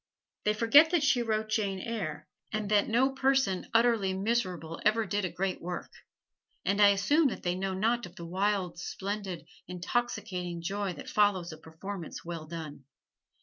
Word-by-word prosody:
They 210 0 +2
forget 285 +9 +7
that 335 -3 +2
she 265 -4 +3
wrote 220 -2 -1
"Jane 205 -3 0
Eyre," 185 -9 -4 0.3
and 215 -1 -2
that 205 -1 +4
no 255 +4 +3
person 265 -8 +1
utterly 230 -5 +3
miserable 185 -6 -1
ever 215 +1 +3
did 205 0 -1
a - - -1
great 185 +2 -2
work; 175 +1 -5 0.7
and 200 +1 +2
I 205 - +9
assume 275 +11 +3
that 255 - -4
they 175 - +1
know 190 +1 -2
not 230 +3 +1
of 175 - -17
the 170 - -8
wild, 185 0 -1
splendid, 190 -2 -4 0.2
intoxicating 180 -2 -3
joy 195 +1 -2
that - - -10
follows 195 -5 +2
a 155 - -9
performance 170 +2 -8
well 165 -2 -6
done. 155 -4 -7
200 Hz, 165 wpm, -30 LUFS, 180-225 Hz, 0.7 s, I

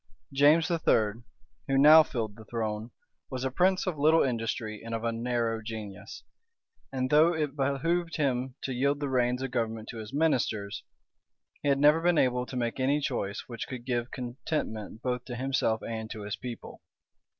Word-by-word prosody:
James 150 +5 +5
III., 115 -9 +2 0.5
who 135 - +2
now 150 +3 +9
filled 115 -9 -3
the 110 - -13
throne, 110 -1 -3 0.4
was 130 -1 -4
a 130 - -1
prince 185 +6 +2
of 175 -6 -3
little 155 +3 +5
industry 115 -3 -2
and 115 0 -4
of 115 - -4
a 115 - +1
narrow 115 -1 -1
genius; 110 -3 -8 0.7
and 130 -1 -2
though 160 +3 +5
it 150 -3 -2
behoved 165 +5 0
him 130 -3 -1
to 130 - -2
yield 140 +3 +1
the 145 - -2
reins 125 0 +1
of 135 - -3
government 115 -3 -2
to 115 - -7
his 110 0 -8
ministers, 125 -9 0 0.8
he 145 - 0
had 140 - +4
never 150 +3 +5
been 175 -1 +3
able 125 -2 +2
to 130 - -5
make 120 +1 -2
any 140 +3 +2
choice 100 -8 -2
which 115 -3 -6
could 125 -2 -7
give 120 -1 -1
contentment 120 -4 -4
both 125 -1 -1
to 125 - -6
himself 125 -3 0
and 110 -1 -4
to 110 -3 -7
his 105 0 -3
people. 125 -2 -8
125 Hz, 180 wpm, -29 LUFS, 115-145 Hz, 0.8 s, now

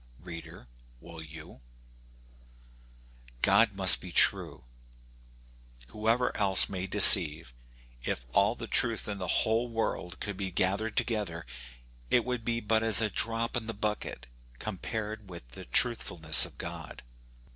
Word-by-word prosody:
Reader 85 -2 -11
J - - -26 0.3
will 85 +4 -13
you? 80 -3 -13 1.8
God - - +3
must - - +5
be - - -11
true, - - +1 1.3
whoever 115 - -2
else 95 -2 +1
may 95 -1 -6
deceive. 85 - +7 0.5
If - - -5
all - - +1
the - - -9
truth 115 -2 -1
in 100 -1 -6
the 90 - -6 0.2
whole 115 +2 -1
world 110 -5 -5
could 100 -2 -7
be 95 -1 -5
gathered 100 +5 -3
together, 100 - -3 0.6
it 120 - +1
would 125 -2 -5
be 115 0 -3
but 110 +1 -1
as 110 -2 +5
a 110 -2 -1
drop 115 0 -1
in 115 -2 -5
the 115 - -7
bucket 105 - -6 0.3
compared 110 - -7
with 85 -8 -12
the 65 - -11
truthfulness 80 - +3
of - - -20
God. - - -10
105 Hz, 135 wpm, -27 LUFS, 85-115 Hz, 1.8 s, deceive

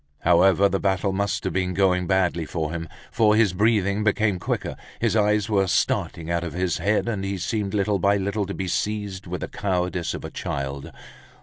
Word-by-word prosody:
However 95 +3 +5
the 95 0 -1
battle 95 0 0
must 100 +2 -1
have 95 - -2
been 90 -1 -1
going 90 -1 +2
badly 90 -3 +1
for 80 -3 -3
him, 85 -1 -5 0.2
for 105 -1 +4
his 110 -4 +3
breathing 105 0 +2
became 105 -2 +1
quicker, - - -3 0.2
his 115 -2 +1
eyes 105 -1 +2
were 100 -3 +2
starting 85 -1 0
out 85 0 0
of 85 - -5
his 90 -1 -1
head, 105 +6 +1
and 105 -4 -2
he 100 0 -2
seemed 100 +1 -2
little 100 0 +1
by 100 +3 +3
little 100 +1 -2
to 100 - -5
be 95 - -3
seized 100 -1 -2
with 90 +1 -4
the - - -3
cowardice 90 -3 -2
of - - -7
a - - -7
child. 70 0 -4
95 Hz, 200 wpm, -24 LUFS, 90-105 Hz, 0.2 s, However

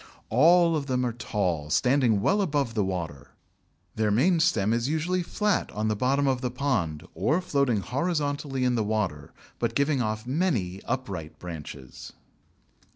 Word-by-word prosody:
All 165 +7 +5
of 145 -2 -2
them 125 -1 0
are 120 - -1
tall, 90 -10 -2
standing 125 - +3
well 200 - +2
above 145 -9 0
the 105 -3 +1
water; 85 -8 -5 0.6
their 110 -1 0
main 150 - +3
stem 115 - +2
is 120 +3 0
usually 165 +4 0
flat 210 +3 0
on 110 +1 -1
the 110 - +1
bottom 135 +6 +1
of 130 -2 +1
the 125 - -1
pond, 110 - -2
or 120 - +1
floating 140 - +1
horizontally 145 - -1
in 125 -1 +2
the 115 -2 +1
water, 100 -10 -2 0.3
but 115 -1 -1
giving 140 -1 +2
off 110 0 -2
many 125 - -1
upright 100 -11 -4
branches. 75 -7 -9
125 Hz, 155 wpm, -27 LUFS, 100-145 Hz, 0.6 s, All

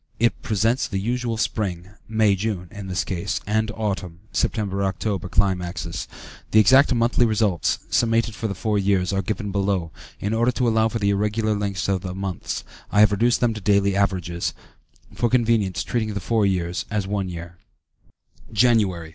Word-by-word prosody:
It 120 +1 +1
presents 115 +4 +1
the 95 - -3
usual 120 +3 -1
spring 95 -5 -2 0.2
(May 110 -2 +3
June, 95 -3 -3
in 105 -2 -8
this 90 -1 -1
case) 100 +3 -2
and 110 +1 0
autumn 95 -5 -3
(September 100 -3 -1
October) 95 0 -2
climaxes. 90 -2 -1 0.4
The 110 - +5
exact 130 +7 +6
monthly 120 0 +2
results, 110 -6 +1
summated 115 -1 +2
for 110 +2 -3
the 100 - -4
four 105 +1 0
years, 95 -1 +1
are 95 - +1
given 105 +1 -3
below; 95 -4 0 0.3
in 100 +2 -2
order 120 +2 +2
to 125 +1 0
allow 110 -1 +3
for 115 - -2
the 100 -2 +1
irregular 105 +2 0
lengths 100 -3 -2
of 95 -2 0
the 90 -1 -5
months, 95 -2 -4 0.3
I 105 - +4
have 105 - +6
reduced 120 +4 +2
them 120 -2 +2
to 110 - -7
daily 100 0 +2
averages, 90 -4 -1 0.6
for 120 - 0
convenience 115 -6 +2
treating 110 -3 -2
the - - -1
four 110 0 +1
years 90 -2 -1
as 105 -2 -1
one 100 -1 -2
year: 85 0 -8 0.9
Jan. 115 +2 +4
100 Hz, 170 wpm, -23 LUFS, 95-110 Hz, 0.9 s, exact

